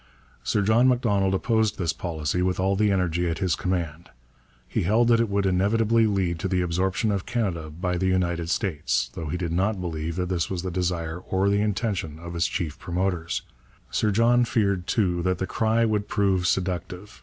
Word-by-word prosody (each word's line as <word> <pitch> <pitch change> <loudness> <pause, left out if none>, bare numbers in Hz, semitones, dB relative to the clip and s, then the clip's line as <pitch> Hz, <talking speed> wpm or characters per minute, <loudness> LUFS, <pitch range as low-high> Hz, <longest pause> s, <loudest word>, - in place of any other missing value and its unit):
Sir 100 - +1
John 115 +5 +4
Macdonald 100 -7 +2
opposed 110 0 +1
this 85 -4 0
policy 80 0 -2
with 90 0 0
all 95 +1 +2
the 105 +1 +2
energy 90 -2 0
at 80 - -2
his 95 -5 +1
command. 85 -3 -3 0.6
He - - -1
held 110 +6 +3
that 115 -1 +5
it 115 -2 +1
would 100 0 0
inevitably 110 +4 +3
lead 95 -5 0
to 95 - -2
the 90 -1 +1
absorption 95 +5 0
of 100 -2 -2
Canada 95 -10 -2
by 90 +3 -2
the 95 - +1
United 85 -2 0
States, 75 -10 -1
though 80 - -5
he 75 - -2
did 85 -2 -3
not 95 +4 0
believe 80 -2 -3
that 90 0 -1
this 90 -3 -1
was 90 -2 -3
the 95 - -3
desire 85 -2 -2
or 95 +2 0
the 100 0 +2
intention 100 -7 -2
of 85 +1 -8
its 85 - +1
chief 85 -4 -4
promoters. 90 -2 -2 0.5
Sir 110 - +1
John 115 +4 +4
feared 100 -6 0
too 90 -6 +1
that 90 +1 0
the 95 - -2
cry 110 +3 +1
would 105 -2 0
prove 95 -3 +1
seductive. 90 +2 -3
95 Hz, 195 wpm, -25 LUFS, 85-105 Hz, 0.6 s, that